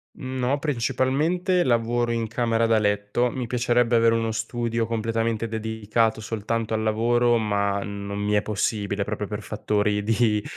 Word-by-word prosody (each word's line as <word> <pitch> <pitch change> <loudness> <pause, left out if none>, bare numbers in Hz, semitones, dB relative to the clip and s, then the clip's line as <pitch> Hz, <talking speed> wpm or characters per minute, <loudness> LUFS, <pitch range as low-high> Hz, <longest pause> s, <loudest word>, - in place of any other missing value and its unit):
Mhmm, 130 -1 -5
no, 130 +3 +1
principalmente 150 +7 +1
lavoro 120 -1 +1
in 115 -1 -1
camera 115 0 +1
da 115 -1 +3
letto, 105 +4 0
mi 125 -1 -4
piacerebbe 120 0 +2
avere 115 0 +4
uno 115 -1 0
studio 115 +1 -2
completamente 115 0 -1
dedicato 110 0 -1
soltanto 110 +1 -3
al 110 0 0
lavoro 120 +2 +2
ma 100 -2 0
non 100 0 -5
mi 105 0 0
è 105 - +3
possibile 100 -1 -1
proprio 105 0 -3
per 105 +1 -5
fattori 105 0 -1
di, 110 -1 +2
115 Hz, 155 wpm, -24 LUFS, 105-120 Hz, -, avere